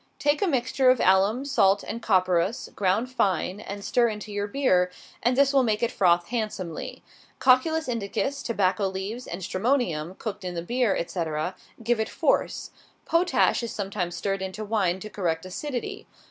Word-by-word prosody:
Take 290 0 +1
a 400 - +2
mixture 260 -2 +2
of 255 -1 +4
alum, 195 +8 +3
salt, 200 -8 +3
and 230 +2 -5
copperas, 185 0 +1
ground 205 +6 +1
fine, 190 -4 0
and 200 -1 -7
stir 240 -1 +3
into 210 -1 -5
your 205 0 -2
beer, 195 -7 +2 0.3
and 245 +2 +2
this 280 0 +4
will 275 - +5
make 220 -2 0
it 235 - +1
froth 175 -2 +2
handsomely. 215 -8 -4 0.3
Cocculus 315 +5 +3
indicus, 240 +4 -2
tobacco 200 -3 +1
leaves, 195 +6 -5
and 175 +2 -6
stramonium, 185 - -1
cooked 205 -3 -5
in 180 -1 -4
the 170 - -3
beer, 240 +1 +1
etc., 165 0 -2 0.3
give 235 0 +1
it 220 - -1
force. - - 0 0.3
Potash 340 -4 +2
is 235 - -4
sometimes 195 -4 -3
stirred 195 +2 -2
into 190 +3 -5
wine 195 -4 0
to 215 - -6
correct 175 -5 -2
acidity. 245 +7 -5
205 Hz, 165 wpm, -26 LUFS, 185-245 Hz, 0.3 s, will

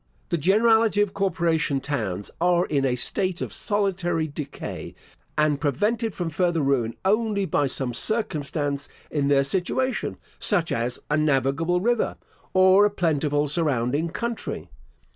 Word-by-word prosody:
The 170 - +1
generality 220 +5 +4
of 205 -2 0
corporation 170 -7 0
towns 105 -9 -3
are 175 0 +3
in 140 -5 0
a 125 -2 +1
state 185 +7 -1
of - - -4
solitary 185 -5 0
decay, 145 -2 -7 0.4
and 150 -2 +2
prevented 210 - 0
from 175 -2 -3
further 170 +1 +1
ruin 130 -5 +1
only 210 0 +1
by 145 -5 +1
some 130 -2 -2
circumstance 145 - -1 0.2
in 145 -2 0
their 140 -1 +4
situation, 190 - -1 0.2
such 175 -6 +2
as 120 +2 -1
a 150 - +3
navigable 155 +4 +1
river, 240 +2 0 0.3
or 190 +1 +6
a 205 - +5
plentiful 150 -6 0
surrounding 145 0 0
country. 235 +6 -4
165 Hz, 135 wpm, -24 LUFS, 140-195 Hz, 0.4 s, or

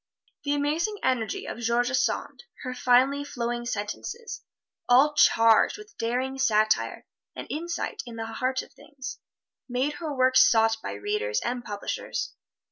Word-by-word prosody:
The 285 0 +1
amazing 315 +9 0
energy 245 -4 0
of - - -6
George 240 +2 +1
Sand, 260 - -1 0.2
her 255 -1 -3
finely 260 +3 +3
flowing 240 -3 -3
sentences 230 - -5 0.5
all 270 +5 +6
charged 230 - +5
with 425 +1 -13
daring 255 +3 -1
satire 215 -4 +2 0.3
and - - -6
insight 340 +3 -3
into 230 -1 -5
the 225 - -7
heart 260 +2 -1
of - - -17
things 275 -4 -9 0.5
made 255 +4 0
her 315 -2 -3
work 260 -1 +3
sought 225 -1 +5
by - - -4
readers 425 +3 -1
and 245 0 -3
publishers. 205 -2 -4
255 Hz, 140 wpm, -27 LUFS, 235-290 Hz, 0.5 s, all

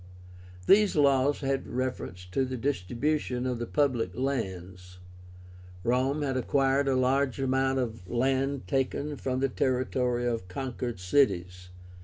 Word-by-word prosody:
These 205 - +5
laws 140 -1 +3
had 135 -1 -1
reference 125 -8 -4
to 135 - +1
the 130 0 -3
distribution 125 - -1
of 125 -2 -2
the 120 - -3
PUBLIC 130 -5 0
LANDS. 95 -8 -4 0.9
Rome 130 +6 +1
had 135 -2 -1
acquired 135 +2 +2
a 135 - +2
large 130 +1 +1
amount 135 0 +1
of 115 -7 -4
land 135 +2 0
taken 140 +2 -1
from 130 -2 -2
the 135 - +3
territory 125 -1 0
of 115 -6 -2
conquered 120 +1 -4
cities. 90 -4 +1
130 Hz, 130 wpm, -28 LUFS, 120-135 Hz, 0.9 s, These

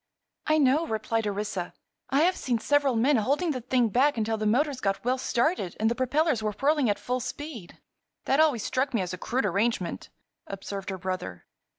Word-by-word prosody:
"I 310 - +4
know," 295 +3 +3
replied 220 0 -1
Orissa. 200 -3 -3 0.3
"I 275 +3 +3
have 360 +3 +3
seen 245 -3 -1
several 280 +2 +2
men 255 +5 +3
holding 285 +10 +1
the 255 -3 -3
thing 245 -1 +1
back 265 +6 +2
until 225 0 0
the 215 -1 -1
motors 265 +4 +1
got 195 +2 -1
well 255 +1 +1
started 240 - 0
and 220 +1 +2
the - - +2
propellers 260 +1 +1
were 215 -1 -1
whirling 285 -3 +2
at 205 - +1
full 250 +1 -2
speed." 255 - -7 0.5
"That 270 - +2
always 290 -9 +3
struck 260 0 -1
me 220 - +2
as 180 0 -4
a 185 - -6
crude 255 +8 -1
arrangement," 200 -4 -1 0.4
observed 195 0 -6
her 190 - -4
brother. 185 - -5
240 Hz, 195 wpm, -27 LUFS, 210-280 Hz, 0.5 s, I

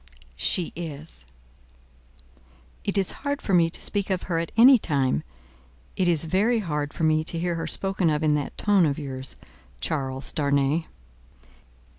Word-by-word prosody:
"She 180 - +1
is." 160 -2 -8 1.6
"It - - -2
is 195 -2 +2
hard 285 0 -2
for 195 - -3
me 170 -2 +4
to - - -4
speak 200 -1 -1
of 185 -2 -1
her 170 -2 -1
at 165 - -4
any 250 +2 +8
time. 135 - 0 0.7
It 185 - +1
is 165 -2 +3
very 205 +9 +2
hard 150 -8 -2
for - - -5
me 155 0 +3
to 165 - -3
hear 175 +1 -1
her 165 -1 -3
spoken 190 -3 +1
of 150 0 0
in 155 -1 +3
that 145 -2 -3
tone 200 -5 +3
of 140 - -1
yours, 135 -3 -5 0.4
Charles 135 - -3
Darnay." 140 +1 +1
165 Hz, 160 wpm, -25 LUFS, 145-185 Hz, 1.6 s, any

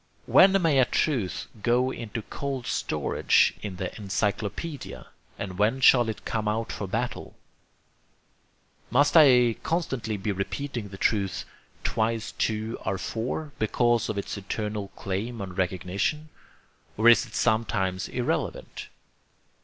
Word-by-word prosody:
When 195 +1 +6
may 160 -6 +3
a 130 - +6
truth 120 -9 -1 0.2
go 125 +3 +2
into 115 -2 -5
cold 135 -1 -4
storage - - +2
in 100 -3 -5
the 95 0 -5
encyclopedia? 105 - -3 0.3
and 95 -1 -6
when 110 +6 +2
shall 120 -3 +6
it 110 - -6
come 110 -2 -2
out 110 +2 -1
for 100 - -4
battle? 115 +6 -3 1.5
Must 145 +5 +3
I 125 -7 +6
constantly 135 -10 -2
be 100 +2 -2
repeating 115 +4 -4
the 95 - -9
truth 100 -2 0 0.4
'twice 110 0 -1
two 110 +1 -2
are 95 - -2
four' 125 +10 -4
because 120 +1 +2
of 110 - -2
its 100 - -3
eternal 105 +1 -4
claim 110 +5 -4
on 95 -2 -5
recognition? 95 - -1 0.7
or 110 +2 +3
is 120 - +7
it - - -12
sometimes 105 -5 0
irrelevant? 125 -1 -3
110 Hz, 130 wpm, -26 LUFS, 100-125 Hz, 1.5 s, is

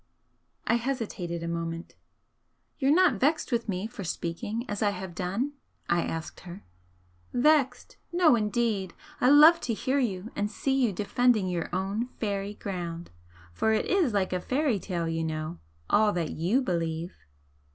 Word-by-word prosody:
I 235 - +3
hesitated 220 -9 -3
a - - -3
moment. 165 0 -4 0.9
"You're 270 -2 +2
not 325 - +4
vexed 305 +5 +1
with 235 -2 0
me 190 +1 -2
for 220 -2 -7
speaking 205 +7 -3
as 205 -1 -4
I 210 - +3
have 190 -2 -6
done?" 195 - -2 0.4
I 170 0 +3
asked 165 0 -5
her. 180 +2 -10 0.7
"Vexed? 265 -1 +2
No, 345 -6 +5
indeed! 210 -4 0 0.2
I 250 - +4
love 310 +4 +8
to 230 - -1
hear 265 +5 0
you 215 -4 -2
and 205 +1 -1
see 265 +5 -1
you 255 -5 +2
defending 210 +1 +2
your 175 -2 -2
own 195 +6 -1
fairy 200 -1 -2
ground! 175 -4 -5 0.4
For 220 - +1
it 215 - +1
IS 360 -9 +2
like 195 -3 0
a 180 - -1
fairy 260 - 0
tale, 175 -3 -3
you 165 0 -1
know 155 +1 -4 0.3
all 215 0 +4
that 170 -4 -2
YOU 195 - +1
believe!" 170 -3 -2
205 Hz, 160 wpm, -28 LUFS, 175-245 Hz, 0.9 s, love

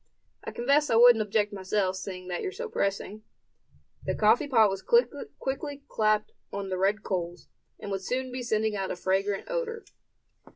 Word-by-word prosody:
I - - -5
confess 280 +5 +2
I - - +3
wouldn't 235 -1 +7
object 210 0 0
myself, 190 -1 -1
seeing 185 -1 -7
that 180 -1 -3
you're 380 - -3
so 470 +5 -5
pressing." 200 - -2 0.8
The - - -1
coffee 220 +6 +4
pot 225 -7 +5
was 195 0 -4
quickly 290 - -1
clapped 215 -2 +1 0.2
on 200 -1 -4
the 185 -1 -2
red 200 +3 +1
coals, 175 -2 -4 0.3
and 200 - -6
would 195 -1 -2
soon 255 +6 -2
be 250 0 -4
sending 220 -2 0
out 195 -1 -2
a - - -2
fragrant 195 +2 -1
odor. 485 -2 -3
215 Hz, 170 wpm, -28 LUFS, 195-260 Hz, 0.8 s, wouldn't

